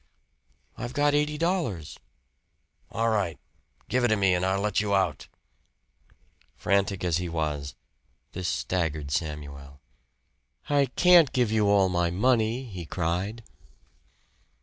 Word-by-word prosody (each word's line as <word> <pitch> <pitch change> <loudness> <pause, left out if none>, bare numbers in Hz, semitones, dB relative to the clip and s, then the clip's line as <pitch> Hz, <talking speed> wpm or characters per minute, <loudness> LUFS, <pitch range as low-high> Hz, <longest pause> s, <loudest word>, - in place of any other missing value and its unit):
"I've 120 +1 -5
got 145 0 +2
eighty 150 +1 +1
dollars." 160 - -2 0.9
"All 115 +1 0
right. 100 -7 -1 0.5
Give 125 +1 0
it - - +4
to 110 - +2
me 95 -3 +2
and 90 0 0
I'll 95 +1 +1
let 105 -1 0
you 100 -1 0
out." 75 -8 -1 1.3
Frantic 100 0 0
as 85 -3 +1
he 90 -1 -3
was, 75 -5 -3 0.6
this 90 0 -4
staggered 80 -6 -2
Samuel. 70 -2 -5 0.9
"I 140 -1 +2
can't 175 -6 +6
give 120 -4 +1
you 105 -2 +2
all 100 -2 +4
my 85 -2 0
money," 115 +5 +1
he 95 -8 -8
cried. 90 +8 -2
95 Hz, 125 wpm, -26 LUFS, 85-120 Hz, 1.3 s, can't